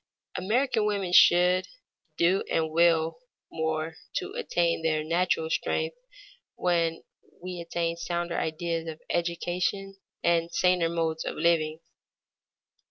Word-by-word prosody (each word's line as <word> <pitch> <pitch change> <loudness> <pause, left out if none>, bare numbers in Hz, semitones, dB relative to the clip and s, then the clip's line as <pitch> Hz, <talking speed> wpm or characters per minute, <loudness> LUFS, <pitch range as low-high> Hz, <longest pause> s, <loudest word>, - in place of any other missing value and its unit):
American 220 +3 +1
women 195 -4 -1
should 180 +1 +6 0.5
do 180 +3 +3
and 160 -1 0
will 165 0 +3
do - - -24 0.3
more 160 0 -2 0.2
to 385 +1 -3
attain 175 - 0
their 155 -1 0
natural 165 0 +1
strength 475 - -1 0.6
when 170 -2 0 0.4
we 180 0 -6
attain 170 0 -2
sounder 170 0 -3
ideas 165 +1 -2
of 160 -1 -6
education 180 +3 -2 0.3
and 170 -1 +2
saner 180 -2 +2
modes 165 -1 -1
of - - -4
living. 160 -2 +1
170 Hz, 115 wpm, -27 LUFS, 165-180 Hz, 0.6 s, should